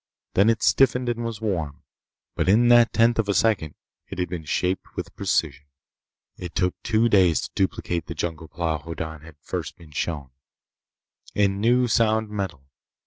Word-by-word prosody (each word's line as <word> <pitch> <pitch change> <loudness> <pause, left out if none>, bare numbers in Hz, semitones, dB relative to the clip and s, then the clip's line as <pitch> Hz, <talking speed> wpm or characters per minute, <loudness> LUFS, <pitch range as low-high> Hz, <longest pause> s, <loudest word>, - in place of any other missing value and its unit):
Then 100 +4 +4
it 115 -1 +1
stiffened 125 +3 +3
and 120 0 -2
was 115 -2 -5
warm. 85 -10 -3 0.5
But - - 0
in 120 +5 +5
that 120 -1 +6
tenth 115 0 +3
of 105 -2 0
a 100 - +1
second 95 -10 +1 0.3
it - - -8
had 90 -1 -2
been 85 -3 -5
shaped 90 +5 -2
with - - -6
precision. 70 -3 -1 0.7
It 90 -2 -8
took 90 -1 +1
two 115 0 +2
days 95 -7 +4
to - - -6
duplicate 90 -3 -1
the 85 - -6
jungle 80 0 -4
plow 80 -1 -2
Hoddan 80 0 -6
had 80 -1 -14
first - - -5
been 80 -3 -16
shown, 75 -3 -3 1.0
in 100 -1 +1
new 125 +2 +3
sound 110 -1 +2
metal. 95 -9 -4
95 Hz, 170 wpm, -24 LUFS, 80-115 Hz, 1.0 s, that